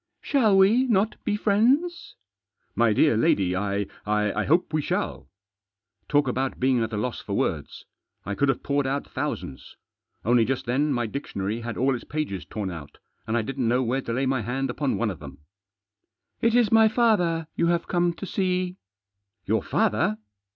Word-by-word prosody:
" - - -55
Shall 220 -9 +4
we 215 +7 +5
not 215 -2 +1
be 210 - 0
friends? 250 - +1 0.2
" 100 0 -65
" - - -47
My 115 - +4
dear 115 +4 +3
lady, 95 -4 +2
I 100 +1 -1
— - - -25
I 105 0 0
hope 165 +2 +2
we 155 - +2
shall." - - -3 0.8
Talk 145 -1 +3
about 130 +1 -2
being 130 -2 +2
at 110 0 -2
a 105 - -3
loss 120 +3 -3
for - - -6
words! - - -3 0.4
I 100 - -3
could 140 +7 +1
have 135 - 0
poured 140 -1 0
out 140 +1 -2
thousands. 65 -1 -5 0.5
Only 120 +1 +4
just 130 +2 -2
then 140 +5 +1
my 120 -3 0
dictionary 110 -3 -4
had 115 -1 -5
all 135 +2 +2
its 125 - -5
pages 150 - -4
torn 100 -3 -4
out, 80 -4 -9 0.3
and 110 +2 0
I 115 - 0
didn't 130 0 -2
know 125 +3 +2
where 130 +3 0
to 115 - -5
lay 130 +3 0
my 130 -1 0
hand 125 +4 -2
upon 140 +2 -1
one 115 -3 0
of 85 - -9
them. 70 -2 -10 0.6
" 110 +3 -53
It 230 0 +3
is 240 -4 +3
my 225 -1 +6
father 195 -8 +2
you 170 - +1
have 170 0 0
come 175 0 +1
to 185 - -7
see." 185 -1 -1 0.7
"Your 110 +1 +1
father?" 105 - +1
135 Hz, 195 wpm, -25 LUFS, 110-175 Hz, 0.8 s, my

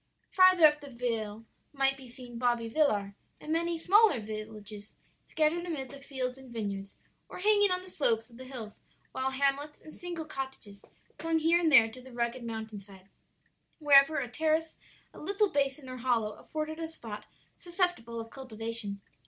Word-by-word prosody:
"Farther 370 -3 +7
up 300 -1 +5
the 285 - -9
vale 225 -3 -3 0.3
might 270 -1 +2
be 265 -1 -12
seen 240 -1 -10
Bobbi 240 -2 +1
Villar, 205 -10 +2 0.3
and 310 - -3
many 335 +1 +2
smaller 385 - +5
villages 215 -1 -7 0.3
scattered 320 +2 +1
amid 295 -7 -4
the 280 - -10
fields 265 -2 -4
and 260 -2 -13
vineyards, 200 -3 -5 0.3
or - - -8
hanging 410 +1 +4
on 365 0 -1
the 370 - -12
slopes 225 -8 +2
of 235 -2 -17
the 260 - -9
hills, 235 -5 -8 0.4
while 260 0 -1
hamlets 280 +2 -1
and 310 - -13
single 345 -3 -6
cottages 265 -8 -7 0.4
clung 330 0 +1
here 330 +2 +3
and 330 -2 +2
there 235 -5 +8
to 255 - -11
the 260 +1 -13
rugged 235 +1 -2
mountain 220 -2 -5
side, 195 -1 -16 0.7
wherever 290 0 +6
a 250 - -1
terrace, 315 +5 0 0.4
a - - -12
little 400 +1 +1
basin 275 -1 0
or 255 0 -7
hollow 235 -4 +1
afforded 310 +7 -5
a 325 - -3
spot 225 -10 -9 0.3
susceptible 345 -11 -1
of 225 0 -8
cultivation. 225 -5 0
265 Hz, 170 wpm, -30 LUFS, 225-315 Hz, 0.7 s, there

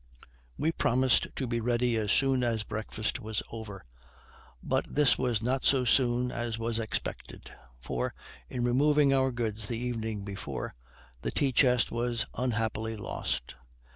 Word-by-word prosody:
We 160 - +1
promised 130 -4 +3
to 135 - -1
be 120 -1 -1
ready 120 +1 +1
as 105 -2 0
soon 135 -2 +3
as 115 -3 0
breakfast 110 0 -3
was 110 -1 -3
over, 105 - -7 0.8
but - - +1
this 145 -3 +4
was 120 -4 0
not 130 +2 0
so 130 -2 +3
soon 125 0 +3
as 120 -1 -3
was 115 0 -1
expected; 110 -1 -4 0.3
for, 60 +1 -3 0.3
in 125 - -2
removing 140 +3 +4
our 130 -1 +3
goods 110 -3 -3
the 115 - -2
evening 115 -4 -3
before, 100 -1 -5 0.5
the - - -2
tea 140 -2 +1
chest 125 -1 +4
was 120 0 -1
unhappily 110 -2 -1
lost. 80 -10 -3
120 Hz, 145 wpm, -30 LUFS, 110-125 Hz, 0.8 s, this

